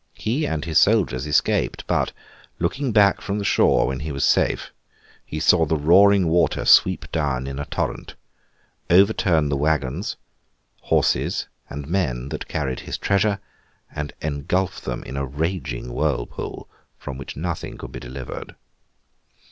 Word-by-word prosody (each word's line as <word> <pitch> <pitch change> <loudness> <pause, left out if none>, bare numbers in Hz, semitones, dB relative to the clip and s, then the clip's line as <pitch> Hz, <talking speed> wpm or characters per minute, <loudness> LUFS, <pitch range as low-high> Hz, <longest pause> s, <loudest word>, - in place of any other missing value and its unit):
He 130 +8 -1
and 80 0 -2
his 80 -2 +3
soldiers 90 - +2
escaped; 75 - +1
but, - - 0 0.5
looking 130 +10 -1
back 105 -2 +4
from 100 0 -3
the 100 - -3
shore - - +4
when 65 +1 -2
he 75 +2 -4
was 70 -1 0
safe, - - +1 0.5
he 75 - -5
saw 85 +1 +4
the 80 0 +1
roaring 95 +5 +5
water 85 +1 +2
sweep 95 0 +4
down 70 -5 -1
in 70 0 -5
a 70 - -3
torrent, - - -3 0.7
overturn 90 -5 +4
the 70 - 0
waggons, 75 +3 -1 0.7
horses, - - +1 0.2
and 70 -1 -6
men, 70 -8 -1
that 75 - -5
carried 70 -5 -2
his - - -5
treasure, 100 +1 +1 0.5
and 75 0 -5
engulf 75 +5 -1
them - - -4
in 65 +3 -7
a 70 - -1
raging 70 -5 -3
whirlpool 70 -5 -3 0.3
from 65 0 -7
which 70 - -8
nothing 85 +2 -4
could - - -9
be - - -7
delivered. 65 +1 -8
80 Hz, 150 wpm, -23 LUFS, 70-95 Hz, 0.7 s, roaring